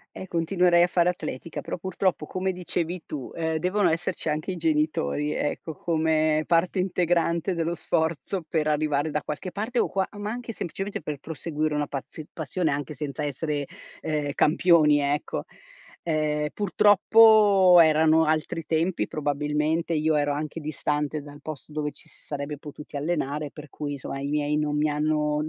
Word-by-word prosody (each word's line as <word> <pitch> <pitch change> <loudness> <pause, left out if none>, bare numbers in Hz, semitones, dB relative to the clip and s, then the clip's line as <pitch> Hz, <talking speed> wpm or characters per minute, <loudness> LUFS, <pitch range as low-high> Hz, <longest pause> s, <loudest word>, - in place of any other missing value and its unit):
E 190 - -7
continuerei 175 0 +3
a - - +4
fare 175 -1 +2
atletica, 160 -3 -5
però, - - -5
purtroppo, 185 -3 -1
come 190 +1 -1
dicevi 180 -1 -3
tu, 140 -5 -6
ehm, 160 -1 -1
devono 180 +2 +2
esserci 165 0 -1
anche 155 +4 -2
i 180 - -5
genitori, 150 - 0
ecco, 160 +2 -3
come 155 -2 +1
parte 170 +3 +2
integrante 175 -1 +1
dello 165 0 -1
sforzo 165 +2 -1
per 155 -1 0
arrivare 150 0 +1
da 150 0 -2
qualche 150 +5 -5
parte 225 +6 -2
o - - +2
qua 190 -1 0
ma 205 0 -3
anche, 235 0 -5
semplicemente, 195 +4 -4
per 150 -2 -4
proseguire 155 +1 -3
una 150 -1 -1
pazio 145 +3 -7
passione 160 +2 -2
anche 145 0 -2
senza 150 +1 -4
essere, 145 0 -2 0.4
ehm, 150 -2 -2
campioni, 155 -2 +4
ecco. 145 +1 -1 0.6
Ehm 150 -2 0
purtroppo 205 -2 +6
erano 160 0 +5
altri 155 +1 -1
tempi, 165 +3 0
probabilmente, 150 +3 -1
io 155 0 +2
ero 145 -1 +1
anche 155 +2 -4
distante 150 0 -2
dal 145 0 -12
posto 155 0 -8
dove 150 -1 -2
ci 160 - -11
si - - -10
sarebbe 145 0 -5
potuti 150 0 -9
allenare, 150 -1 -2
per 150 -1 -11
cui, 145 +1 -5
insomma, 135 0 -6
i 140 - -3
miei 150 0 0
non 150 -1 0
mi 150 +1 +2
hanno, 150 0 0
155 Hz, 160 wpm, -26 LUFS, 150-175 Hz, 0.6 s, purtroppo